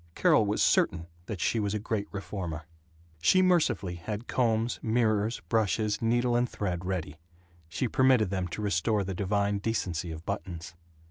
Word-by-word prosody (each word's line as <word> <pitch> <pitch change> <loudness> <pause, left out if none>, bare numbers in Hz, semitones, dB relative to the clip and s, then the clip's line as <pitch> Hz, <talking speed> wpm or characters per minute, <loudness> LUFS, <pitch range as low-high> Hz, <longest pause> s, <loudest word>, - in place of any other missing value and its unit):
Carol 110 - +4
was 105 - +1
certain 85 -1 +2 0.2
that 105 -5 -5
she 115 - +1
was 105 0 -1
a - - +1
great 105 -1 -2
reformer. 90 -6 -5 0.6
She 185 - +5
mercifully 170 - +2
had 105 +7 -5
combs, 115 -1 +1
mirrors, 110 -1 +1
brushes, 110 -1 +1
needle 120 +1 +2
and 120 0 +2
thread 90 -4 -3
ready. 85 -5 -3 0.5
She 125 - -1
permitted 125 -5 +3
them 95 -2 -1
to 90 +5 -5
restore 100 +2 +1
the 95 0 -4
divine 100 +2 0
decency 95 -6 -2
of 80 +1 -7
buttons. 90 -4 -5
105 Hz, 155 wpm, -29 LUFS, 90-115 Hz, 0.6 s, She